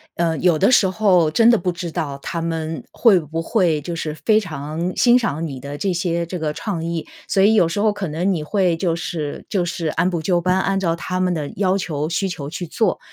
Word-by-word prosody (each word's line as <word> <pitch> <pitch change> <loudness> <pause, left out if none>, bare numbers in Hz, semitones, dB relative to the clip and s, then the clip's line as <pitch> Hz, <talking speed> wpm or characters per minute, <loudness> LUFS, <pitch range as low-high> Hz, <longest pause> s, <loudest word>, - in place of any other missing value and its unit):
呃， 165 -2 0
有 175 -3 +3
的 200 +6 +4
时 200 -6 +5
候 185 -4 +3
真 230 +8 +5
的 235 - +5
不 180 -2 -1
知 170 -1 -6
道 140 -3 -3
他 170 - -4
们 160 -3 -3
会 215 -7 +4
不 160 +1 -4
会 165 -5 +1
就 170 +4 -5
是 155 -2 -3
非 215 -1 +5
常 160 -1 -4
欣 245 0 +5
赏 165 - -1
你 135 -5 -6
的 140 +2 -7
这 195 +5 -1
些 170 -1 -1
这 180 +2 -5
个 155 -2 -2
创 170 -2 -4
意， 170 -1 -3 0.2
所 195 - +2
以 210 +3 +5
有 175 -6 +4
时 170 +5 -3
候 215 +1 +3
可 205 -2 -4
能 165 +6 -1
你 165 -5 -1
会 180 0 +1
就 165 -1 0
是 160 -3 -5
就 185 -4 0
是 170 -1 -3
按 165 +4 +1
部 170 -3 -2
就 175 +1 +1
班， 185 +2 +1
按 195 0 0
照 170 -3 0
他 185 +2 -4
们 185 -1 +1
的 150 -3 -3
要 190 -1 +2
求 155 -6 -3
需 190 +3 -1
求 145 -5 -5
去 175 +2 -5
做。 220 +7 0
170 Hz, 260 characters per minute, -20 LUFS, 160-190 Hz, 0.2 s, 时